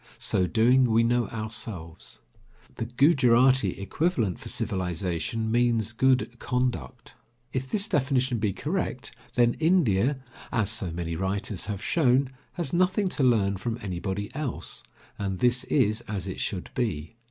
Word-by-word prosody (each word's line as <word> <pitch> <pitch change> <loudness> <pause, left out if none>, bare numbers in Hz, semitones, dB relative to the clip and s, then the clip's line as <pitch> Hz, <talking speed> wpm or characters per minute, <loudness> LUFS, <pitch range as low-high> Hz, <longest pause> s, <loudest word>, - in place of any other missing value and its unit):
So 90 - +1
doing, 120 +5 +4
we 115 -1 +3
know 120 0 +2
ourselves. 110 -7 -6 0.6
The 115 - -2
Gujarati 125 - +4
equivalent 110 - 0
for - - -7
civilization 95 +4 -2
means 115 -2 +2
"good 125 0 +1
conduct." 125 0 -2 0.4
If 130 0 -2
this 205 +5 +1
definition 130 - +1
be 105 -2 +1
correct, 140 - -3 0.2
then 120 -1 +4
India, 145 - +3 0.3
as 110 -2 +1
so 115 -6 -2
many 85 0 -4
writers 95 +2 -2
have 100 -1 -4
shown, 135 -4 +2 0.2
has 165 -6 -3
nothing 185 +3 +2
to 160 - -3
learn 100 -6 +3
from 115 +4 -3
anybody 95 0 -4
else, 140 -4 -3 0.4
and 95 -2 -2
this 125 +4 +2
is 110 -5 +2
as 100 -3 -3
it 95 - -5
should 95 -4 -2
be. 110 -6 -2
115 Hz, 140 wpm, -27 LUFS, 100-130 Hz, 0.6 s, doing